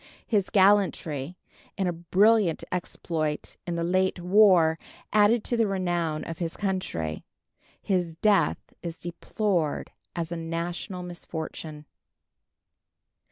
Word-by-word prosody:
His 205 Hz, -4 st, +1 dB
gallantry 185 Hz, -6 st, +2 dB, 0.4 s
in 195 Hz, -, 0 dB
a 175 Hz, -, 0 dB
brilliant 185 Hz, +2 st, +3 dB
exploit 160 Hz, -4 st, -3 dB
in 175 Hz, -, -2 dB
the 170 Hz, -, -1 dB
late 185 Hz, +2 st, +1 dB
war 180 Hz, -3 st, +5 dB, 0.3 s
added 210 Hz, +2 st, +5 dB
to 240 Hz, -, 0 dB
the 230 Hz, -2 st, +2 dB
renown 175 Hz, -5 st, -1 dB
of 165 Hz, -, -6 dB
his 165 Hz, -2 st, -3 dB
country. 185 Hz, -, -2 dB, 0.6 s
His 180 Hz, -4 st, 0 dB
death 205 Hz, +3 st, +3 dB, 0.2 s
is 170 Hz, -1 st, -5 dB
deplored 175 Hz, -1 st, -2 dB, 0.2 s
as 170 Hz, -1 st, -3 dB
a 170 Hz, -, -2 dB
national 170 Hz, +2 st, -4 dB
misfortune. 160 Hz, -3 st, -7 dB
175 Hz, 115 wpm, -27 LUFS, 165-195 Hz, 0.6 s, war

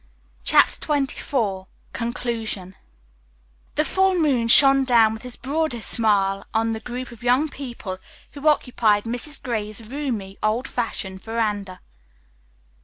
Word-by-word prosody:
'" -, -, -34 dB
CHAPTER -, -, +4 dB
XXIV 255 Hz, -9 st, -1 dB, 0.3 s
CONCLUSION 230 Hz, -5 st, -3 dB, 1.0 s
The 305 Hz, -, +2 dB
full 380 Hz, +2 st, +2 dB
moon 270 Hz, -8 st, +2 dB
shone 270 Hz, +3 st, +7 dB
down 230 Hz, -4 st, +4 dB
with 220 Hz, -, -8 dB
his 250 Hz, -1 st, -7 dB
broadest 275 Hz, -3 st, -2 dB
smile 195 Hz, -4 st, +1 dB
on 225 Hz, 0 st, +1 dB
the 220 Hz, -, -4 dB
group 245 Hz, +2 st, -6 dB
of 235 Hz, -, -13 dB
young 250 Hz, +5 st, +3 dB
people 235 Hz, -10 st, -7 dB, 0.3 s
who 285 Hz, +1 st, -4 dB
occupied 230 Hz, -8 st, +3 dB
Mrs. 245 Hz, +6 st, -4 dB
Gray's 215 Hz, -2 st, -4 dB
roomy, 230 Hz, -9 st, -4 dB
old 220 Hz, +5 st, 0 dB
fashioned 190 Hz, -5 st, -3 dB
veranda. 210 Hz, -4 st, -2 dB
230 Hz, 125 wpm, -23 LUFS, 210-265 Hz, 1.0 s, shone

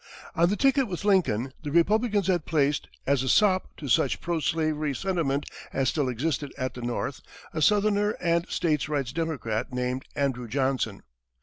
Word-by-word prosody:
On 170 Hz, +1 st, +3 dB
the 205 Hz, -, +1 dB
ticket 270 Hz, +1 st, +3 dB
with 190 Hz, 0 st, -5 dB
Lincoln, 135 Hz, -, +2 dB
the 150 Hz, -, -5 dB
Republicans 205 Hz, +5 st, +3 dB
had 175 Hz, -4 st, 0 dB
placed, 145 Hz, -2 st, +1 dB, 0.2 s
as 140 Hz, -2 st, +2 dB
a 130 Hz, -, -1 dB
sop 190 Hz, +1 st, +4 dB
to 145 Hz, -, -7 dB
such 160 Hz, +5 st, +2 dB
pro 170 Hz, -1 st, -1 dB
slavery 155 Hz, -2 st, 0 dB
sentiment 160 Hz, -7 st, -1 dB, 0.2 s
as 135 Hz, -1 st, +1 dB
still 145 Hz, -5 st, 0 dB
existed 140 Hz, +3 st, -2 dB
at 130 Hz, -1 st, -2 dB
the 125 Hz, -, -8 dB
North, 120 Hz, 0 st, -3 dB, 0.3 s
a 155 Hz, -, -2 dB
southerner 210 Hz, +2 st, +3 dB
and 170 Hz, 0 st, +1 dB
state 150 Hz, -3 st, 0 dB
rights 140 Hz, -5 st, -1 dB
Democrat 140 Hz, -10 st, -2 dB
named 125 Hz, +1 st, -2 dB
Andrew 130 Hz, -4 st, -1 dB
Johnson. 130 Hz, -4 st, -1 dB
155 Hz, 170 wpm, -27 LUFS, 130-180 Hz, 0.3 s, sop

